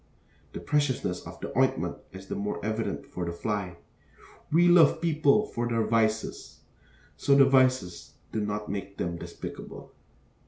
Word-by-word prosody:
The - - -5
preciousness 145 -11 0
of - - -10
the - - -6
ointment - - +1
is 95 0 -10
the - - -5
more 100 +1 -3
evident 110 +1 -2
for 90 - -6
the 85 - -2
fly. 90 -1 -3 0.7
'We 170 +3 +5
love 170 -4 +6
people 155 +3 +3
for 120 - -3
their 115 -2 0
vices,' 110 0 -1 0.6
so 140 - +3
the 140 -1 +7
vices 130 -8 +2 0.2
do 110 - -2
not 105 0 -3
make 100 0 -5
them 85 -1 -3
despicable. - - -9
110 Hz, 150 wpm, -28 LUFS, 100-140 Hz, 0.7 s, the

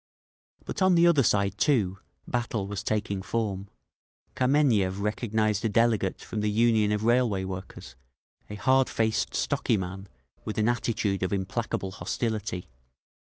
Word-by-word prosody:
But - - -5
on 185 -1 +5
the 170 0 +5
other 170 -5 +5
side, 100 -4 +1
too, 100 -10 +2 0.3
battle 120 -4 -2
was 100 0 -4
taking 105 -3 -2
form. 100 -2 -3 0.7
Kameniev 125 -8 +2
recognised 110 0 0
a 115 - +1
delegate 110 -3 +1
from 110 - -4
the 105 - +1
Union 110 -1 +3
of 105 0 -1
Railway 115 -4 +2
Workers, 95 -9 -7 0.5
a 105 - -6
hardfaced, 115 -2 +1
stocky 115 - +1
man 95 +1 -5 0.4
with 110 - -5
an 110 +1 +2
attitude 110 -5 -1
of 95 - -1
implacable 95 0 -2
hostility. 105 -2 -3
105 Hz, 135 wpm, -27 LUFS, 100-120 Hz, 0.7 s, on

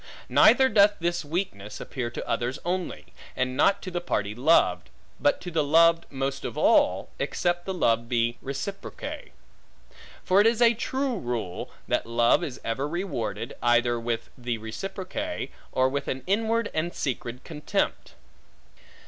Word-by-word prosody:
Neither 265 -1 +6
doth 205 -3 +5
this 175 0 -1
weakness 145 - -4
appear 125 -3 -4
to 120 - -7
others 120 +3 -1
only, 180 +1 -3 0.3
and 130 0 -1
not 200 +8 +3
to 185 - -5
the 175 0 -2
party 105 -11 -1
loved; 140 +9 +3 0.3
but 290 - +2
to 180 - -6
the 160 -2 +1
loved 165 +3 +4
most 135 0 -3
of - - -5
all, - - +3
except 175 0 -1
the 190 - -1
love 115 -7 +1
be 120 -1 0
reciproque. 195 +9 -6 0.9
For 190 +2 +4
it 215 - +5
is 230 0 +2
a 235 -1 +6
true 260 0 -2
rule, 120 - -4 0.2
that - - 0
love 120 +7 +3
is 135 -6 -5
ever 125 +5 -2
rewarded, 135 - -3
either 120 0 +3
with 115 0 -3
the 120 -2 -3
reciproque, 195 - -5 0.2
or 130 0 +3
with 140 +2 -3
an 130 0 -3
inward 225 +3 +1
and 170 +2 -2
secret 125 -1 -3
contempt. 150 -2 -2
150 Hz, 150 wpm, -26 LUFS, 120-190 Hz, 0.9 s, Neither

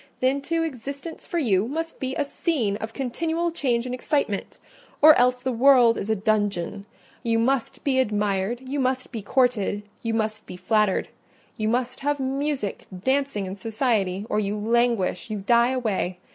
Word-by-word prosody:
Then, 265 +2 +1
too, 330 +3 -1
existence 280 +2 -6
for 345 - -2
you 215 - +2
must 325 +5 -4
be 260 0 -3
a 290 - 0
scene 275 - -1
of 220 +1 -5
continual 325 +7 -1
change 250 -7 0
and 250 - -4
excitement, 250 -5 -1 0.4
or 310 +1 +9
else 250 -1 +2
the 260 - 0
world 245 -1 +5
is 205 - -4
a 220 - +3
dungeon: 205 -2 -1 0.3
you 230 -1 +1
must 250 +2 0
be 265 -2 +2
admired, 210 0 0
you 280 +2 -2
must 255 0 -1
be 225 -3 -5
courted, 210 -3 +1 0.2
you 230 -1 -1
must 215 -1 -2
be 180 - -8
flattered—you 210 +3 -2
must 245 +2 -1
have 290 +1 -1
music, 270 -4 -2 0.2
dancing, 270 -6 0
and 190 +1 -7
society—or 215 -3 0
you 205 0 -1
languish, 230 -2 +1
you 215 - -2
die 235 +4 +3
away. 215 -8 -1
240 Hz, 160 wpm, -24 LUFS, 210-270 Hz, 0.4 s, or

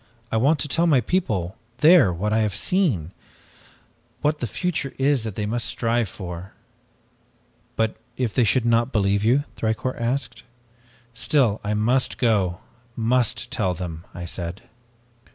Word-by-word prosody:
'I - - +1
want 140 +7 +3
to - - 0
tell 165 +4 +2
my 145 -5 +5
people 110 - -1 0.2
there 150 - +6
what 105 +5 -2
I 110 - +3
have 105 -2 0
seen 115 - +1 1.1
what 150 0 +1
the 120 - -2
future 145 - -3
is 135 -2 +2
that 110 -4 -5
they 105 - -2
must 115 +3 -1
strive 115 -2 0
for.' 90 +1 -8 1.2
"'But 110 -1 0 0.2
if 120 -5 -1
they 125 - +3
should 115 +3 +2
not 115 +2 +2
believe 100 -1 +1
you?' 125 +6 +3
Thicourt 110 +3 -2
asked. 125 +2 -2 0.7
"'Still 115 -3 +1
I 105 +1 -1
must 120 +5 +1
go 100 -8 +1 0.3
must 120 0 0
tell 100 -8 0
them,' 85 -1 -7
I 90 - -7
said. 85 +1 -5
115 Hz, 150 wpm, -23 LUFS, 100-130 Hz, 1.2 s, there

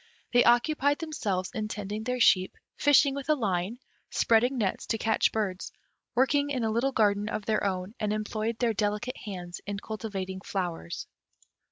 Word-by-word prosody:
They 245 - +6
occupied 285 +4 +3
themselves 210 - -2
in 215 -3 -2
tending 210 +1 -5
their 250 0 -1
sheep, 185 -5 +4 0.2
fishing 285 -1 +5
with 280 +1 -6
a 305 - +5
line, 200 -3 -1 0.3
spreading 245 +4 +3
nets 200 -5 -1
to 225 - 0
catch 220 0 +2
birds, 200 -4 -2 0.4
working 285 +3 +3
in 260 -4 -1
a 220 - +1
little 240 +5 +1
garden 210 -3 +2
of 215 -2 -3
their 215 -1 +1
own, 190 0 -2
and 210 -1 0
employed 215 +1 -2
their 235 -2 +1
delicate 210 +4 -1
hands 180 -4 -6
in 205 0 -3
cultivating 195 -3 -5
flowers. 175 - -4
215 Hz, 165 wpm, -28 LUFS, 200-245 Hz, 0.4 s, They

